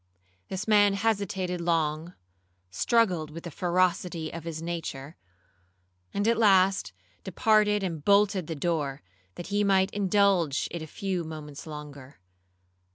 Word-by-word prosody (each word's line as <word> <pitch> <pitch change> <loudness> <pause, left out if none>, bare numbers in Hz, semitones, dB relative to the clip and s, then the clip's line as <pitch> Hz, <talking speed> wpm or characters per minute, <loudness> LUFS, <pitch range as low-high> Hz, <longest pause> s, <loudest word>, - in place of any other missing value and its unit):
This 190 +3 -5
man 205 -2 +5
hesitated 195 -4 -1
long, 165 0 -1 0.6
struggled 180 - +1
with 165 +2 -9
the 170 - -7
ferocity 175 -2 0
of 165 -1 -7
his 165 -2 -5
nature, 165 -4 -5 1.0
and 205 +2 -1
at 230 0 +2
last 195 - +4 0.3
departed 210 +1 +2
and 165 -5 -4
bolted 200 -3 +3
the 165 - -4
door, 145 -3 -2 0.3
that 175 - -7
he 205 0 +2
might 190 -1 +3
indulge 195 -6 +2
it 170 - -5
a 160 - -7
few 185 +2 -3
moments 155 -2 -9
longer. 145 -4 -10
175 Hz, 130 wpm, -27 LUFS, 155-200 Hz, 1.0 s, man